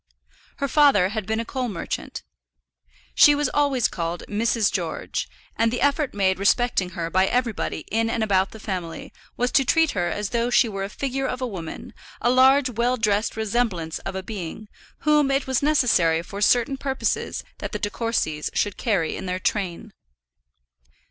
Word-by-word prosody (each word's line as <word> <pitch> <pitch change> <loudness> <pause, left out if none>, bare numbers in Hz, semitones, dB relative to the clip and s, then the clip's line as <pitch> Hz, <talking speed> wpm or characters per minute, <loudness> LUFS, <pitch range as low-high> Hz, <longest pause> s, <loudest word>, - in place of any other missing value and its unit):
Her 280 - -2
father 275 -11 +4
had 210 -2 -4
been 220 +1 0
a 230 - -3
coal 255 0 -3
merchant. 175 -5 -5 0.9
She 295 - +7
was 290 -2 0
always 280 -5 +2
called 170 0 -4
Mrs. 220 0 +1
George, - - -3 0.3
and 230 0 +2
the 245 - -2
effort 285 -2 +1
made 190 -2 +1
respecting 200 -4 +1
her 165 -1 -3
by 190 +1 +3
everybody 240 -9 -1
in 225 +2 +1
and 230 -1 0
about 195 -2 +2
the 220 - -12
family 180 -6 -5 0.2
was 245 +1 0
to 270 - +4
treat 325 +4 +3
her 180 -3 -1
as 205 +1 -3
though 235 0 0
she 245 0 +4
were 195 -3 -4
a 195 - -4
figure 270 +3 -2
of 250 - -3
a 255 - -2
woman, 180 -9 -7 0.3
a 240 - +2
large 265 +2 +5
well 240 +2 0
dressed 215 0 0
resemblance 205 -8 -1
of - - -6
a 190 - -4
being, 205 +1 -7 0.3
whom 300 -1 +3
it 275 0 +1
was 260 -1 0
necessary 235 - +3
for 200 +3 -8
certain 245 +5 +3
purposes 270 -1 -2 0.2
that - - -5
the - - -2
De 205 - -3
Courcys 215 -11 -1
should 205 -2 0
carry 195 -9 0
in 190 - -6
their 180 0 -1
train. 185 -2 -3
220 Hz, 180 wpm, -23 LUFS, 190-255 Hz, 0.9 s, She